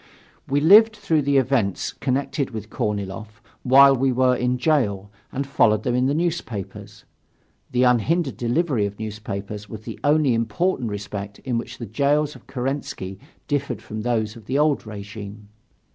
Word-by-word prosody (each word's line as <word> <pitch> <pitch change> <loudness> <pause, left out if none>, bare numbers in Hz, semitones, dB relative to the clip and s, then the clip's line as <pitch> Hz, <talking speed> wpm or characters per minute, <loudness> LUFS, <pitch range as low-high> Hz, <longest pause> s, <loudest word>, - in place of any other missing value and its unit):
We 140 +1 +1
lived 215 +7 +7
through 170 -7 +1
the 140 0 +2
events 125 -7 0
connected 135 +1 -1
with 110 -3 -7
Korniloff, 105 +1 -4 0.2
while 135 +2 +7
we 135 +1 +1
were 125 0 +3
in 125 0 0
jail, 105 -9 0 0.2
and 140 +2 -3
followed 110 -6 +2
them 125 - 0
in 125 +1 +2
the 140 - +1
newspapers; 155 - -4 0.7
the 125 0 +2
unhindered 135 - +2
delivery 120 -3 0
of 100 0 -9
newspapers 105 -1 -6
was 110 -2 -8
the - - -8
only 145 -3 +3
important 115 - 0
respect 100 0 -6
in 120 -3 0
which - - -8
the 120 - -6
jails 145 +7 +1
of - - -16
Kerensky 130 -8 -4 0.3
differed 140 -5 -2
from 110 0 -6
those 110 -2 -1
of 110 -3 -14
the 130 - 0
old 150 -5 +1
regime. 105 0 -9
125 Hz, 160 wpm, -23 LUFS, 105-140 Hz, 0.7 s, lived